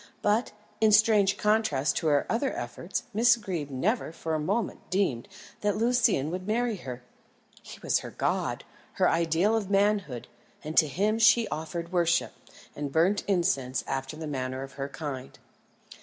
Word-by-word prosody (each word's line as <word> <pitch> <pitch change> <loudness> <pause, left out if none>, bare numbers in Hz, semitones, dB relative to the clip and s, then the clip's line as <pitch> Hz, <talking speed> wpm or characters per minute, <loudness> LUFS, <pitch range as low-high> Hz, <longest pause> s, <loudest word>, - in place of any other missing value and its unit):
But, 210 +4 +1 0.3
in 220 -1 +4
strange 205 -2 +4
contrast 155 -11 +1
to 160 - -1
her 145 -2 +3
other 260 +4 0
efforts, 145 +10 -4
Miss 235 +3 +5
Greeb 180 -9 -4
never 170 - -1
for 165 -1 -4
a 155 - 0
moment 200 +8 -2
deemed 180 -12 0 0.3
that 205 -1 0
Lucian 230 - +2
would 185 +2 -5
marry 230 0 0
her. 125 -6 -8 0.6
He - - -11
was - - +2
her - - -8
god, - - -2 0.3
her - - +2
ideal 170 +6 +2
of 210 -4 -2
manhood, 200 - +1 0.4
and 155 +1 -5
to 155 - +6
him 210 - 0
she 225 +1 +5
offered 165 +2 -5
worship, 170 -1 +2 0.4
and 145 -1 -4
burnt 175 +7 +2
incense 135 -10 0
after 135 +2 -4
the 160 - -6
manner 130 -2 -3
of 135 - -9
her 140 +1 -5
kind. 140 -3 -6
175 Hz, 160 wpm, -28 LUFS, 145-210 Hz, 0.6 s, to